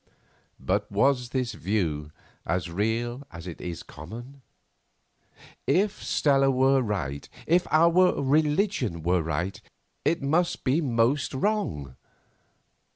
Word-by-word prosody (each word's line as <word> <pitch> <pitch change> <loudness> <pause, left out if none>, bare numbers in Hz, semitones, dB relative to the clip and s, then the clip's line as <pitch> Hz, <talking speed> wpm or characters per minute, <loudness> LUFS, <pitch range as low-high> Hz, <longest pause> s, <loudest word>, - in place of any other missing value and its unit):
But 105 +3 -1
was 125 +3 +2
this 125 -3 -2
view 80 -9 -2 0.3
as 90 0 -2
real 115 +6 -1
as 85 +1 -9
it 85 -3 -8
is 85 -2 -5
common? 120 - -10 1.3
If 200 +3 +1
Stella 135 -2 +3
were 135 +1 +3
right, 80 - -3 0.2
if 175 +2 +2
our 170 +3 +4
religion 145 - +1
were 90 +1 +2
right, 80 +4 -3 0.4
it 165 -3 +1
must 165 +5 +1
be 140 +5 +2
most 130 +1 +1
wrong. 130 - -1
120 Hz, 110 wpm, -26 LUFS, 90-145 Hz, 1.3 s, our